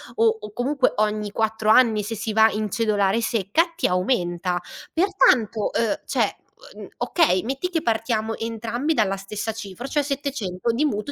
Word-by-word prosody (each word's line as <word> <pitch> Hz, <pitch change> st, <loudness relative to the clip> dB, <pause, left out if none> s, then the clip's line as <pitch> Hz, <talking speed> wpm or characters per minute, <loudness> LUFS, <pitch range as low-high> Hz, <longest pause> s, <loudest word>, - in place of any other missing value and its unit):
o 225 Hz, -1 st, +3 dB
o 210 Hz, 0 st, -8 dB
comunque 265 Hz, +2 st, +1 dB
ogni 210 Hz, -1 st, 0 dB
4 220 Hz, 0 st, -1 dB
anni, 220 Hz, -2 st, +5 dB
se 225 Hz, +2 st, -4 dB
si 220 Hz, +1 st, -4 dB
va 220 Hz, 0 st, +6 dB
in 215 Hz, 0 st, -2 dB
cedolare 215 Hz, -1 st, +1 dB
secca, 230 Hz, -, +1 dB
ti -, -, +2 dB
aumenta. 180 Hz, -2 st, 0 dB, 0.3 s
Pertanto, 285 Hz, -, +2 dB
ehm, 225 Hz, -3 st, 0 dB
cioè, -, -, 0 dB, 0.4 s
uhm, -, -, -9 dB
okay, 240 Hz, -, +2 dB
metti 270 Hz, +9 st, -3 dB
che 330 Hz, -3 st, -1 dB
partiamo 225 Hz, -1 st, -1 dB
entrambi 230 Hz, +6 st, -2 dB
dalla 195 Hz, -6 st, +1 dB
stessa 210 Hz, +3 st, -4 dB
cifra, 220 Hz, +2 st, -8 dB
cioè 295 Hz, +2 st, 0 dB
700 270 Hz, -8 st, -2 dB
di 275 Hz, +7 st, +1 dB
mutuo 215 Hz, 0 st, -2 dB
225 Hz, 160 wpm, -23 LUFS, 210-255 Hz, 0.4 s, va